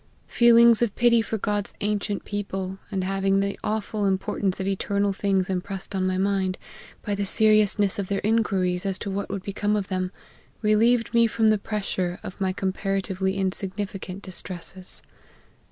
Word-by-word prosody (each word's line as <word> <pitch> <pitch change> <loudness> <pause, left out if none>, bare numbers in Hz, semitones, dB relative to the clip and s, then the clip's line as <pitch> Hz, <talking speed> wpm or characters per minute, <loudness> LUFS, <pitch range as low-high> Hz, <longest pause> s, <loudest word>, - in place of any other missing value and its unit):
Feelings 235 -1 +6
of 235 -4 +1
pity 235 -1 +4
for 220 0 -3
God's 205 0 -2
ancient 205 0 -2
people, 195 -2 -4
and 195 -3 -2
having 195 +1 +1
the 200 0 -2
awful 210 -1 -1
importance 190 0 -1
of 190 - -2
eternal 200 +1 0
things 195 -1 0
impressed 190 +1 -2
on 190 -1 0
my 185 0 0
mind, 190 -1 0 0.5
by 205 - -1
the 200 0 -1
seriousness 210 -1 +3
of 195 - -2
their 195 0 -1
inquiries 195 -5 +1
as 195 -2 0
to 200 - -5
what 200 +1 -3
would 195 -1 -4
become 205 +1 -1
of 200 -2 -2
them, 185 -1 -2 0.5
relieved 230 +3 +3
me 235 0 +5
from 220 -1 +2
the 215 - +2
pressure 190 -4 -3
of 185 - -8
my 190 -1 +1
comparatively 190 0 -2
insignificant 195 0 -3
distresses. 185 0 -2
195 Hz, 160 wpm, -25 LUFS, 190-210 Hz, 0.5 s, Feelings